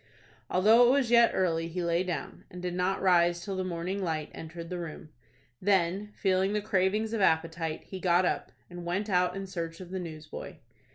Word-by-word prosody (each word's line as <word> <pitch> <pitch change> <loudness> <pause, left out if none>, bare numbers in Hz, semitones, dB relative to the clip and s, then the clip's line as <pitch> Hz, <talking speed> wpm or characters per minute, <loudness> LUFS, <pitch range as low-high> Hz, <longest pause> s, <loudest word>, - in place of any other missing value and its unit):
Although 220 +6 +6
it - - +5
was 260 -2 +2
yet 235 -1 +7
early 165 -3 +1
he 175 +2 -3
lay 170 0 +1
down, 180 -2 -5
and 180 - -9
did 180 0 -3
not 180 +2 0
rise 175 -2 +3
till 195 -2 -3
the 185 - -1
morning 185 +2 -3
light 155 -3 -2
entered 165 +1 -8
the 180 - -3
room. 160 -1 -7 0.5
Then, 195 +1 +1
feeling 190 0 +1
the 210 - +1
cravings 210 +2 0
of 225 - -1
appetite, 165 -2 +1
he 190 - -8
got 180 0 +3
up, - - -1 0.2
and 175 -1 -9
went 190 +5 -2
out 180 0 +2
in 195 0 -4
search 165 -3 -5
of 185 -1 -10
the 190 - -3
newsboy. 155 -3 -8
180 Hz, 195 wpm, -29 LUFS, 170-195 Hz, 0.5 s, yet